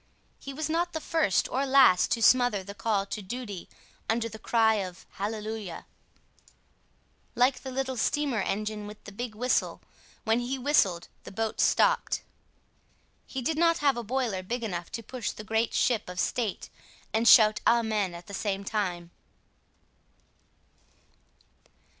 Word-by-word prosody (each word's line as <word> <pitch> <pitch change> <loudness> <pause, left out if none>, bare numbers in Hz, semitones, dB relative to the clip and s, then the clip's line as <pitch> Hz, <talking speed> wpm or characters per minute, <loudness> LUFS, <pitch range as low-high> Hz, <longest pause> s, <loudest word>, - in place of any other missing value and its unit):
He 275 - -7
was 300 +3 -3
not 340 +2 -1
the 320 - -2
first 315 - +1
or 265 - 0
last 265 -9 +5
to 230 - -1
smother 245 -6 +4
the 200 +2 -8
call 205 -1 0
to 210 - -5
duty 205 -2 -6 0.4
under 230 +1 +1
the 220 -1 -10
cry 220 0 +3
of 185 -2 -8
Hallelujah. 210 -2 -5 1.5
Like 250 +2 +3
the 265 - -6
little 260 0 -3
steamer 275 -2 0
engine 210 +1 -3
with 210 0 -11
the - - -10
big 225 +2 -6
whistle, 250 +4 0 0.4
when 225 +1 +2
he 250 +2 -2
whistled 225 - +2 0.2
the - - -10
boat 220 +2 -3
stopped. - - +2 1.0
He 265 -2 -5
did 315 +5 -1
not 335 0 +4
have 285 -4 +2
a 240 - -3
boiler 235 -4 -1
big 235 +6 -4
enough 175 -6 -4
to 230 - -4
push 250 -1 -4
the 215 - -7
great 220 +2 0
ship 225 -6 +1
of 180 0 -6
state 225 -2 -2 0.4
and 225 +2 +2
shout 215 -4 +7
Amen 215 -6 +2
at 170 - -10
the 200 - -11
same 200 -1 -2
time. 180 -5 -3
225 Hz, 150 wpm, -28 LUFS, 200-255 Hz, 1.5 s, shout